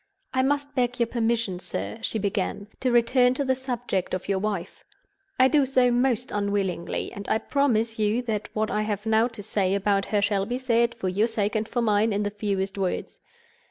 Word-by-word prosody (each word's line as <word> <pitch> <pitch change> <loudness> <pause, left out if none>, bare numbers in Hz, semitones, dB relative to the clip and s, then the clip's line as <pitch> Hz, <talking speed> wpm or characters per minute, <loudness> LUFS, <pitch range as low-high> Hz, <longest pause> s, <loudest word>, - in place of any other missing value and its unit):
"I 260 - +3
must 285 +1 0
beg 250 -1 0
your 235 - +4
permission, 230 -5 -1
sir," 105 - -5
she - - -2
began, 200 0 -2
"to 255 - +1
return 250 +1 +4
to 280 - -1
the 260 - +3
subject 245 -8 -2
of 185 - -6
your 195 -1 +1
wife. 195 -3 -4 0.6
I 260 - +7
do 290 +1 +4
so 255 -2 +3
most 245 -1 +1
unwillingly; 200 -4 -1
and 200 - -7
I - - +3
promise 230 -4 0
you 215 +3 +1
that 215 -3 -3
what 215 0 0
I 210 - 0
have 210 0 -3
now 220 +1 +3
to 225 -4 -9
say 195 -2 0
about 200 0 +1
her 210 - +1
shall 200 -1 +1
be 245 +2 -1
said, 235 -2 +1
for 225 -5 -3
your 200 +5 +2
sake 215 -2 -1
and 215 0 0
for 240 -1 0
mine, 215 0 +2
in 205 +1 0
the 205 - -2
fewest 200 -1 -2
words. 185 -2 -2
220 Hz, 205 wpm, -25 LUFS, 200-245 Hz, 0.6 s, I